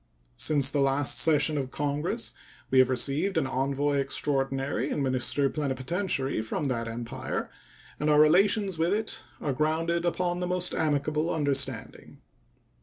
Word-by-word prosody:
Since 140 - +2
the 145 - 0
last 135 -1 +2
session 150 -1 +3
of 130 -2 -3
Congress 145 - -2 0.4
we 130 - +5
have 130 0 +5
received 140 +9 0
an 160 - +2
envoy 140 +2 0
extraordinary 135 0 -1
and 145 - -1
minister 130 +2 +1
plenipotentiary 135 - -1
from 110 +6 -3
that 115 -2 -2
Empire, 115 +1 -5 0.5
and 150 - 0
our 150 0 +5
relations 190 +4 +3
with 170 +5 +2
it 220 0 -2 0.2
are 140 - -2
rounded 165 +4 0
upon 175 0 -1
the 180 - -2
most 180 0 -1
amicable 150 +1 0
understanding. 135 -6 -2
145 Hz, 140 wpm, -28 LUFS, 135-165 Hz, 0.5 s, we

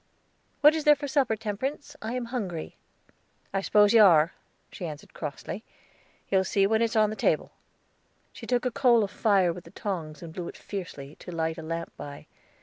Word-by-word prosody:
"What 300 +1 +8
is 315 -1 -2
there 295 0 +7
for 290 0 -5
supper, 270 -5 +2
Temperance? 260 +8 -4
I 220 +2 -4
am 250 -1 -2
hungry." 185 -10 -4 0.8
"I 195 - +1
spose 205 +1 +4
you 225 - +8
are," 170 -5 +6 0.4
she 175 - -5
answered 150 -2 -9
crossly. 155 +7 -6 0.7
"You'll 190 -1 +3
see 195 +1 +2
when 220 +2 +2
it's 230 +1 +1
on 215 -1 +4
the - - -4
table." - - +1 0.8
She - - -10
took 245 0 +1
a 250 - +1
coal 235 -2 +4
of 200 - -3
fire 195 -5 +3
with 175 0 -10
the - - -12
tongs, 170 -7 -5
and 165 -1 -8
blew 175 -1 -5
it - - -8
fiercely, 155 -7 -7
to - - -9
light 160 -1 -2
a - - -5
lamp 165 +1 -5
by. 145 0 -8
200 Hz, 195 wpm, -27 LUFS, 165-235 Hz, 0.8 s, What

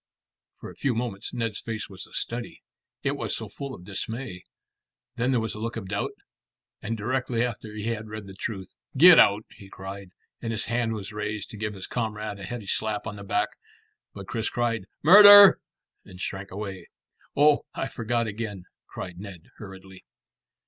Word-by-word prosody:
For - - -8
a - - -15
few 135 -5 0
moments 115 -4 -4
Ned's 115 -3 -3
face 110 -2 -4
was 95 -1 -8
a - - -21
study. 120 0 -4 0.4
It - - 0
was - - -2
so - - -5
full 140 -2 -7
of 90 - -13
dismay. 100 +1 -5 0.7
Then 120 +2 0
there 130 -3 +3
was 110 0 -3
a 105 - -8
look 115 +1 -4
of 95 -4 -6
doubt, 100 0 -2 0.7
and 115 +2 -3
directly 120 +1 0
after 110 -2 -6
he 110 +2 -3
had 110 -1 -4
read 110 -1 -7
the 95 - -10
truth. 95 -1 -6 0.2
"Get 175 +4 +10
out!" 100 +2 +5
he 95 - -14
cried, 95 0 -8 0.3
and 115 - -3
his 110 -1 -2
hand 115 -1 0
was 105 -1 -6
raised 105 0 -4
to 110 - -9
give 105 0 -3
his 95 - -6
comrade 110 -3 -3
a 100 - -7
heavy 115 +1 -6
slap 105 +1 -1
on 110 -1 -5
the 100 - -9
back; 105 +1 0 0.6
but 100 -1 -10
Chris 115 -1 -2
cried 115 -5 -1 0.2
"Murder!" 205 +4 +10 0.4
and 90 -1 -13
shrank 95 +1 -5
away. 95 -1 -6 0.5
"Oh, 145 0 +5
I 135 - -2
forgot 115 -2 -1
again," 105 -3 -5 0.2
cried 90 -1 -8
Ned 95 -3 -10
hurriedly. 95 -2 -11
110 Hz, 185 wpm, -26 LUFS, 100-115 Hz, 0.7 s, Get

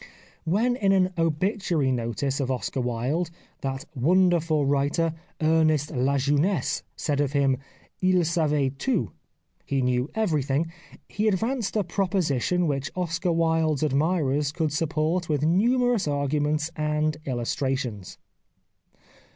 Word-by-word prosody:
When 220 +9 +2
in 195 -4 +3
an 185 -1 +2
obituary 165 - 0
notice 125 +3 -2
of 135 -2 -1
Oscar 130 0 -2
Wilde 125 +8 -1 0.3
that 135 -1 -3
wonderful 165 +1 +2
writer, 145 +4 +1 0.3
Ernest 155 -2 +2
La 140 0 +1
Jeunesse, 145 +4 +1
said 145 -1 -1
of 140 -1 -1
him, 135 -2 +2 0.2
// - - -33
savait 155 -7 +1
tout 195 - 0 0.5
(he 135 -2 -1
knew 125 +2 0
everything), 155 -6 0 0.4
he 210 +2 -1
advanced 225 +2 0
a 210 - +2
proposition 180 - 0
which 140 -3 -1
Oscar 180 0 -1
Wilde's 160 -3 +1
admirers 150 -1 +1
could 155 -2 -1
support 160 +2 0
with 150 -2 0
numerous 235 +5 +2
arguments 150 +2 0
and 150 0 0
illustrations. 125 -4 -3
155 Hz, 120 wpm, -25 LUFS, 140-180 Hz, 0.5 s, in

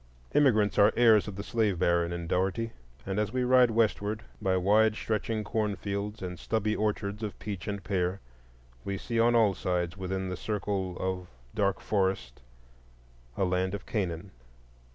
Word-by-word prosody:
The - - +4
Jew 130 -7 +5
is 105 -1 +2
the 105 +1 +5
heir 115 -2 +7
of 105 -1 -3
the 100 - -5
slave 105 -4 0
baron 85 -1 +2
in 85 -1 -4
Dougherty; 95 +6 0 0.3
and 95 +1 -2
as 105 0 0
we 130 +1 0
ride 125 -1 +5
westward, 110 -1 0 0.2
by 95 -2 +2
wide 105 +4 +4
stretching 110 0 -2
cornfields 105 -1 -2
and 90 -2 -5
stubby 110 +1 0
orchards 105 0 -2
of 105 -2 -4
peach 100 -3 -6
and 100 -1 -3
pear, 95 -1 -1 0.6
we 100 0 -3
see 115 +3 -2
on 120 +1 +4
all 110 -4 +5
sides 90 -1 -2
within 95 0 -3
the 90 - -3
circle 100 -3 -2
of 95 -1 -2 0.3
dark 100 -2 +1
forest 95 - -1 1.0
a 95 - +2
Land 95 +1 0
of 100 - -8
Canaan. 95 -3 -3
100 Hz, 170 wpm, -29 LUFS, 95-110 Hz, 1.0 s, heir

